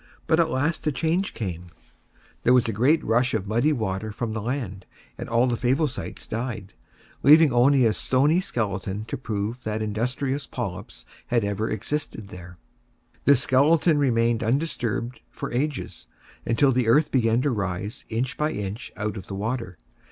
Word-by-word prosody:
But 160 - +2
at 165 -1 +3
last 155 +3 -1
a - - +3
change 165 +7 -1
came: 90 -5 -5 0.7
there 125 - +4
was 125 - +3
a 115 - -1
great 140 +9 +3
rush 120 +2 +2
of 105 -3 -2
muddy 120 +9 +2
water 110 -5 -2
from 110 +1 -4
the 110 - -3
land, 110 -6 -4 0.3
and - - -7
all 120 +2 +3
the 120 -2 +1
Favosites 130 +4 -1
died, 110 -4 -4 0.5
leaving 155 -1 +7
only 130 +1 +5
a 110 - +3
stony 145 - +2
skeleton 100 - -3
to - - -4
prove 110 0 -3
that 110 -1 -3
industrious 125 +6 -2
Polyps - - -6 0.2
had 120 -2 +1
ever 100 +2 -1
existed 110 -2 -4
there. 90 -1 -11 0.7
This 140 -2 +5
skeleton 150 +4 +4
remained 115 -4 +2
undisturbed 120 -2 -1
for - - -6
ages, 140 +3 -3 0.4
until 135 +4 +3
the 125 -2 +1
earth 145 +6 +4
began 115 -3 +2
to 145 - +1
rise 100 -1 -3
inch 120 +4 -2
by 150 +1 0
inch 105 +3 -5
out 105 +1 -3
of 95 - -8
the 100 - -5
water. 110 -2 -3
120 Hz, 165 wpm, -25 LUFS, 110-140 Hz, 0.7 s, leaving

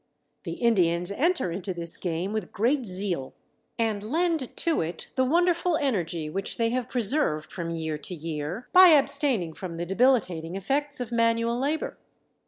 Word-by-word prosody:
The - - -4
Indians 180 -6 +2
enter 315 - +1
into 185 +1 -4
this 170 -1 -4
game 180 +3 -3
with 215 -5 -3
great 245 +4 0
zeal, 180 -7 -2 0.4
and 220 -3 0
lend 315 - -1
to 335 -2 +1
it 165 +1 -5
the 260 - +2
wonderful 340 +3 +2
energy 175 - -1
which 190 +5 -3
they 230 -1 +1
have 250 -1 -2
preserved 225 - 0
from 170 -3 -4
year 160 -2 -3
to 180 - -6
year 160 +6 -5
by 370 0 +9
abstaining 275 - +3
from 170 -1 -7
the 170 - -3
debilitating 185 -6 +1
effects 280 +9 0
of 240 -1 -5
manual 230 0 +2
labor. 295 +4 -2
210 Hz, 160 wpm, -26 LUFS, 170-270 Hz, 0.4 s, by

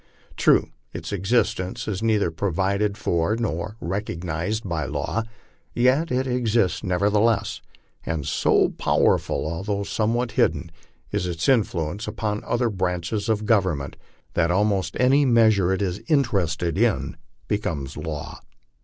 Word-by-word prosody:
True, - - +3 0.2
its - - -6
existence 100 +1 0
is 100 -2 -2
neither 110 -6 +2
provided 100 +4 0
for 90 -2 0
nor 105 -1 -3
recog 90 -1 -3
nized 90 +6 -2
by 80 -4 -2
law; 110 - -2 0.5
yet 130 +7 +3
it 130 +1 +1
exists 120 -6 +1
nevertheless, 105 +4 +1 0.4
and 80 -4 -3
so - - +3
powerful, - - +1
although 100 +5 -2
somewhat 115 +4 0
hidden, - - +1 0.4
is 100 -3 -1
its 85 -2 -2
influence 100 - +1
upon 105 -2 -2
the - - -14
other 120 -1 +1
branches 90 +2 -2
of 105 -1 0
Congress, 95 -10 +1 0.4
that 85 -1 +2
almost 95 -2 +1
any 135 +4 +4
measure 110 -7 +4
it 95 +2 0
is 95 +2 -2
interested 90 - +1
in - - +1 0.3
becomes 80 -9 -2
a - - -6
law. 80 0 -5
100 Hz, 135 wpm, -24 LUFS, 85-110 Hz, 0.5 s, any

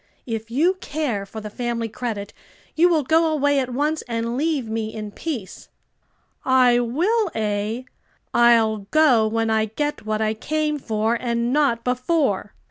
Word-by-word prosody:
"If 225 -1 -4
you 330 +10 +2
care 270 -10 -2
for 220 +2 -8
the 210 - -6
family 235 0 -2
credit 215 -3 -5 0.4
you 345 +3 +5
will 320 -4 +2
go 320 +3 +3
away 285 -2 +2
at 255 -2 -2
once 300 +5 0
and 230 0 -2
leave 290 -3 0
me 220 0 -3
in 215 -2 -6
peace." 245 - -6 0.7
"I 255 -2 +4
will, 355 - +1
eh? 215 +2 -2 0.5
I'll 225 -4 +4
go 265 -8 +4
when 225 0 0
I 220 0 +2
get 295 +7 -3
what 215 0 -2
I 215 0 +1
came 300 +6 -1
for, 220 -2 0
and 235 0 -1
not 275 -6 +2
before." 250 - 0
240 Hz, 155 wpm, -22 LUFS, 220-295 Hz, 0.7 s, you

